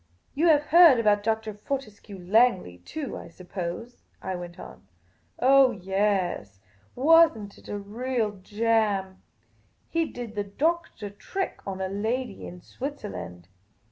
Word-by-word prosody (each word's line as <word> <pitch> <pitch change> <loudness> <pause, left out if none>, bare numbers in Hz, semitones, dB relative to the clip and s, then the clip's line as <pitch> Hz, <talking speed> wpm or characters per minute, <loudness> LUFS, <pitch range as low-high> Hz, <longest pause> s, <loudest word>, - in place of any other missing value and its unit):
" - - -42
You 315 +5 +2
have 300 -3 +5
heard 325 -5 +7
about 210 -2 +3
Dr. 220 0 -1
Fortescue 210 -3 -6
Langley 185 - +2
too, 275 - -6
I - - -8
suppose? 180 +5 -6
" - - -38
I - - -1
went 175 -1 -8
on. 65 0 -12 0.3
" - - -41
Oh, 265 -1 +5
yaas. 190 - -1 0.4
Was 325 +1 +6
n't 205 -2 -9
it - - -15
real 215 +1 -2
jam? 205 -2 0 0.7
He 330 0 +1
did 240 -6 -7
the 205 -1 -2
doctor 245 -1 -2
trick 380 - -4
on 190 -1 -4
a 190 - -1
lady 220 +3 -3
in 180 0 -10
Switzerland. 210 - -7
210 Hz, 140 wpm, -26 LUFS, 190-255 Hz, 0.7 s, heard